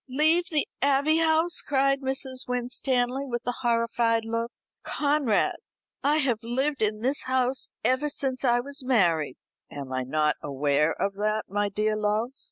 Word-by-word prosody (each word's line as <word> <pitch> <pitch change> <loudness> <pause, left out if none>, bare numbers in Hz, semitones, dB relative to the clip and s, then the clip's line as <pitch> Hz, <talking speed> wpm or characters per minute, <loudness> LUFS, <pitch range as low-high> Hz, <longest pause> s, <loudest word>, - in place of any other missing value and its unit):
"Leave 315 +6 +3
the 305 -4 0
Abbey 285 +3 +3
House!" 325 +1 +2
cried 275 0 +1
Mrs. 265 -1 -1
Winstanley 250 +1 -1
with 240 -3 -4
a 245 0 -2
horrified 230 -1 +1
look. 230 +1 -2 0.3
"Conrad, 285 -7 +1 0.5
I 295 +2 +3
have 250 -7 +1
lived 260 +4 -1
in 215 0 0
this 270 +3 0
house 255 0 0
ever 260 +4 +1
since 265 -2 -3
I 240 -1 +3
was 280 +2 -3
married." 170 - +2 0.3
"Am 140 -2 -7
I 130 - -1
not 150 +4 0
aware 145 +2 +1
of 200 - 0
that, 215 +1 0
my 205 +1 0
dear 215 +2 0
love? 215 +3 0
245 Hz, 155 wpm, -26 LUFS, 215-275 Hz, 0.5 s, Leave